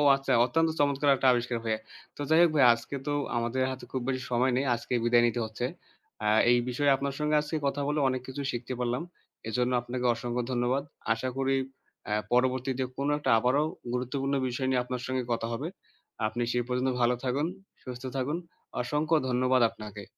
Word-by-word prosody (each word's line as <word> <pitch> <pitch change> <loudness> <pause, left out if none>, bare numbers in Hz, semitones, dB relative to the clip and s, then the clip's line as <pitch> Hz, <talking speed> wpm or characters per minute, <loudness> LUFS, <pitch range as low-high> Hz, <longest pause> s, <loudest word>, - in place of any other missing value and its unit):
আচ্ছা, 135 0 -1
অত্যন্ত 165 +5 +2
চমৎকার 145 0 +2
একটা 130 - +1
আবিষ্কার 120 0 -1
ভাইয়া। 110 -1 -1 0.4
তো - - -8
যাই 160 +1 +5
হোক 170 - +5
ভাইয়া 130 -4 +7
আজকে 115 +4 -6
তো 145 - +1 0.2
আমাদের 120 +2 -1
হাতে 130 - -7
খুব 130 - -2
বেশি 130 -1 -1
সময় 125 +2 +3
নেই, 135 - +1
আজকেই 120 +1 -2
বিদায় 120 0 +5
নিতে 120 +1 -1
হচ্ছে। 110 +3 -4 0.5
অ্যা 105 0 0 0.2
এই 120 - +5
বিষয়ে 140 +3 +2
আপনার 140 0 -3
সঙ্গে 150 0 +1
আজকে 150 +2 -4
কথা 145 +1 -1
বলে 150 +1 0
অনেক 130 -1 -2
কিছু 130 +2 -5
শিখতে 125 +2 -4
পারলাম। 125 +5 -1 0.4
এজন্য 125 +3 0
আপনাকে 125 +1 -4
অসংখ্য 120 +1 -3
ধন্যবাদ। 125 +3 +1 0.3
আশা 130 +3 -3
করি 135 0 +1 0.5
অ্যা 105 - -1 0.2
পরবর্তীতে 130 +1 +1
কোনো 140 +2 0
একটা 140 -3 -2
আবারও 130 +5 +2 0.3
গুরুত্বপূর্ণ 135 +2 -1
বিষয় 130 +2 -2
নিয়ে 125 -1 +2
আপনার 125 0 -4
সঙ্গে 130 -1 -1
কথা 115 0 -1
হবে। 145 +7 -3 0.6
আপনি 120 +2 -4
সে 125 - +1
পর্যন্ত 125 +1 0
ভালো 120 +1 +3
থাকুন, 135 +4 0 0.4
সুস্থ 125 0 -7
থাকুন। 145 +6 -1 0.4
অসংখ্য 150 +5 +1
ধন্যবাদ 125 0 +3
আপনাকে। 105 -2 -9
130 Hz, 185 wpm, -29 LUFS, 120-140 Hz, 0.6 s, ভাইয়া